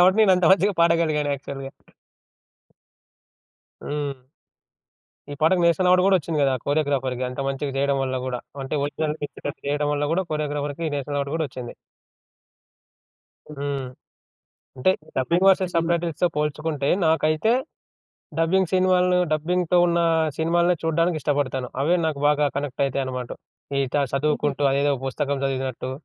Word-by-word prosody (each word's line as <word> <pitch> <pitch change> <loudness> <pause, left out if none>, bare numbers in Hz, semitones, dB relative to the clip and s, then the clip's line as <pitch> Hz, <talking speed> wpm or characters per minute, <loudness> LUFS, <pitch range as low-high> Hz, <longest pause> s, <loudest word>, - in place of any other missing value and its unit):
కాబట్టి, 185 +4 +5
నేను 195 -3 +5
అంత 180 - 0
మంచిగా 195 +2 +3
పాడగలిగాను 165 -3 +2
యాక్చువల్‌‌గా. 135 0 -7 2.1
హ్మ్. 140 -3 -4 1.1
ఈ - - -4
పాటకి 170 +3 +3
నేషనల్ 170 +2 +3
అవార్డ్ 180 0 +5
కూడా 195 - +5
వచ్చింది 160 -1 -3
కదా! 135 -1 +3
కొరియోగ్రాఫర్‌‌కి 140 -4 0
అంత 125 +2 -6
మంచిగా 135 +1 -3
చేయడం 140 0 +1
వల్ల 130 -1 -2
గూడా. 125 -1 -3 0.2
అంటే 135 +3 -4
ఒరిజినల్ 150 +1 -2
టిప్పిటపి 145 0 -6
చేయడం 145 +1 0
వల్ల 145 +1 -1
గూడా 190 +3 +1
కొరియోగ్రాఫర్‌కి 145 0 -3
నేషనల్ 145 +1 -3
అవార్డ్ 140 0 -3
గూడా 160 -2 -1
వచ్చింది. 125 -3 -8 1.8
హ్మ్. 140 -1 -3 1.0
అంటే 130 +8 +3 0.3
డబ్బింగ్ 170 +8 +1
వర్సెస్ 185 -2 +3
సబ్‌టైటిల్స్‌తో 170 0 +1
పోల్చుకుంటే, 150 -1 -1 0.2
నాకైతే 160 +6 +2 0.9
డబ్బింగ్ 180 +2 +2
సినిమాలను 180 -1 +3
డబ్బింగ్‌తో 175 +3 +1
ఉన్న 170 0 +1 0.4
సినిమాలనే 170 +2 +2
చూడడానికి 165 +1 +1
ఇష్టపడతాను. 135 -3 -1
అవే 170 +5 +3
నాకు 145 -3 -2
బాగా 150 0 +3
కనెక్ట్ 140 -1 -2
అయితాయనమాట. 130 -2 -3 0.5
ఈట 135 -2 -3 0.2
చదువుకుంటూ 145 0 0
అదేదో 140 +1 +2
పుస్తకం 140 +1 -2
చదివినట్టు, 130 -1 -3
150 Hz, 125 wpm, -23 LUFS, 140-170 Hz, 2.1 s, కాబట్టి